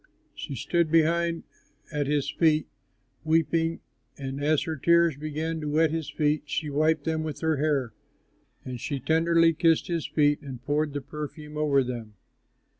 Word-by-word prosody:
She 140 - -6
stood 170 +6 0
behind 165 +1 +2 0.5
at 145 -2 -1
his 145 -1 0
feet, 155 -2 +2 0.6
weeping; 165 +1 +1 0.4
and 135 0 -5
as 150 0 +2
her 160 - -3
tears 170 +1 +3
began 155 +2 -3
to 150 - -3
wet 155 +1 +3
his 160 -2 -3
feet, 150 -1 +1
she 150 0 -2
wiped 155 +1 +2
them 160 0 -1
with 155 -2 -5
her 160 -2 +1
hair. 140 -5 0 0.7
And 125 -1 -5
she 140 -2 -3
tenderly 165 +3 +3
kissed 165 +1 +2
his 170 -3 -1
feet 145 -1 +2
and 135 -4 -8
poured 150 0 0
the 145 - -3
perfume 150 +1 -8
over 145 -3 +2
them. 120 -4 -6
155 Hz, 160 wpm, -27 LUFS, 145-160 Hz, 0.7 s, tears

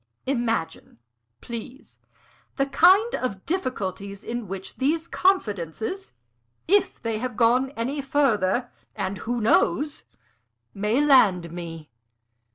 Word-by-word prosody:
"Imagine, 235 - -2 0.4
please, 235 +3 -9 0.6
the 275 - +1
kind 370 - +5
of 200 -7 -3
difficulties 200 - -3
in 240 -2 -4
which 190 +1 -7
these 315 +5 0
confidences, 225 - -1 0.6
if 400 +3 +2
they 225 -2 -2
have 245 -1 -4
gone 250 +3 +3
any 265 +5 -2
further 245 -5 +1 0.2
and 195 -2 -3
who 240 +4 -2
knows? 285 +6 +1 0.7
may 215 +8 +1
land 195 - +4
me. 165 -4 -8
235 Hz, 105 wpm, -25 LUFS, 200-275 Hz, 0.7 s, kind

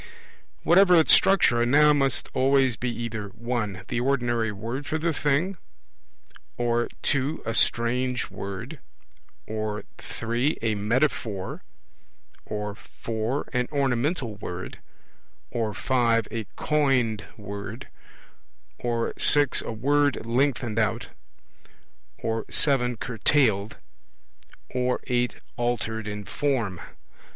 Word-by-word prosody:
Whatever 180 +1 +6
its 160 -2 +6
structure, 155 -11 +5
a - - +3
Noun 150 +2 +5
must 135 -2 +1
always 135 -2 +3
be 125 - -3
either 115 -3 -4
(1) 115 -3 -4
the - - -2
ordinary 120 -4 0
word 115 +8 -5
for 155 - -1
the 165 +1 0
thing, 150 +7 0 1.0
or 120 0 +1 0.2
(2) 145 +3 0
a 115 - -1
strange 125 +2 +1
word, 100 -1 -6 0.7
or 110 -1 -3 0.2
(3) 120 +6 -2
a 110 -1 +2
metaphor, 105 -2 -1 0.9
or 105 -1 -3
(4) 115 +5 -4
an 125 -1 +1
ornamental 135 - 0
word, 90 -2 -7 0.7
or 115 -3 -1
(5) 115 0 +1
a 115 -2 -3
coined 130 -8 +1
word, 100 +2 -7 0.9
or 115 -1 -1
(6) 145 -2 +5
a - - -5
word 145 +4 +1
lengthened 120 -2 0
out, 110 - 0 1.1
or 115 -1 -2
(7) 125 -4 +3
curtailed, 110 -3 +1 1.0
or 125 0 0
(8) 125 -1 0 0.2
altered 115 -2 -2
in 105 -1 -5
form. 115 -12 -1
120 Hz, 105 wpm, -26 LUFS, 110-135 Hz, 1.1 s, Whatever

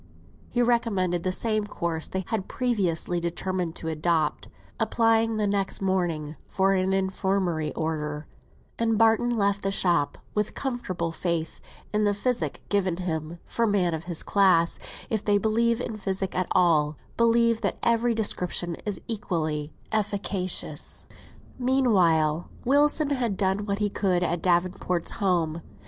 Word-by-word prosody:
He 245 - +1
recommended 200 -8 +1
the 185 - -1
same 215 +1 0
course 170 -5 -3
they 190 0 -3
had 220 -4 -2
previously 185 -8 0
determined 175 0 -2
to 160 - -5
adopt, 160 -1 0 0.3
applying 225 -1 +2
the 210 - +1
next 200 -1 0
morning 170 -6 -1
for 195 0 +2
an 190 0 +1
infirmary 190 -4 0
order; 150 -1 -3 0.5
and 225 -1 +2
Barton 225 +2 +4
left 200 -1 +1
the 195 - 0
shop 175 -6 +2 0.2
with 210 0 -1
comfortable 205 -11 -3
faith 165 -1 -2 0.3
in 210 0 +2
the 205 -1 +2
physic 205 - -1
given 190 -4 +1
him; 165 -2 -3
for 230 -1 0
men 190 -5 +2
of 160 +1 -4
his 175 -2 -2
class, 185 -4 +3 0.3
if 220 -2 0
they 205 -1 +3
believe 230 +3 +2
in 225 -3 -4
physic 195 -2 -2
at 185 -1 0
all, 155 -4 +3 0.2
believe 230 0 +3
that - - -1
every 235 0 +2
description 180 -5 -1
is 205 - -2
equally 160 -8 -2 0.2
efficacious. 200 -6 -1 0.5
Meanwhile, 180 - +2 0.2
Wilson 290 +2 +3
had 240 -8 0
done 195 +1 0
what 200 0 0
he 210 0 +1
could 185 -4 +1
at 170 -1 -1
Davenport's 180 -1 0
home. 170 -4 0
190 Hz, 140 wpm, -26 LUFS, 170-220 Hz, 0.5 s, Barton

